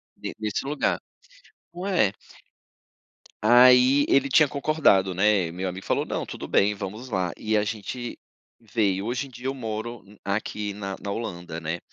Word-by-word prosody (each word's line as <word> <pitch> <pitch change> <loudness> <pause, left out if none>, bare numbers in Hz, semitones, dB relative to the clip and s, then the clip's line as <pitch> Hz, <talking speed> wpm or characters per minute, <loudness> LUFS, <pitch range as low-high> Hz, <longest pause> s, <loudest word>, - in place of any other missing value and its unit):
ne - - -6
nesse 105 +2 -2
lugar. 145 +1 0 0.7
Não 180 +2 -6
é? 180 - +2 1.3
Aí 125 +4 +6
ele 140 0 +4
tinha 145 +1 +5
concordado, 140 - +2
né, 95 -3 +3
meu 90 +2 -3
amigo 95 +2 -8
falou - - 0
"não, - - -3
tudo - - -7
bem, 105 +1 +2
vamos 105 +5 -6
lá", 95 -5 -1
e 110 0 -1
a 105 - +2
gente 115 +3 -5 0.4
veio. 105 -3 0
Hoje 120 +3 -2
em - - -15
dia 125 0 -12
eu 135 - -1
moro 115 -2 -5 0.2
aqui 105 +1 -2
na 100 -1 -5
na 100 - -5
Holanda, 90 -7 -5
né? 80 +2 -3
110 Hz, 160 wpm, -25 LUFS, 95-125 Hz, 1.3 s, Aí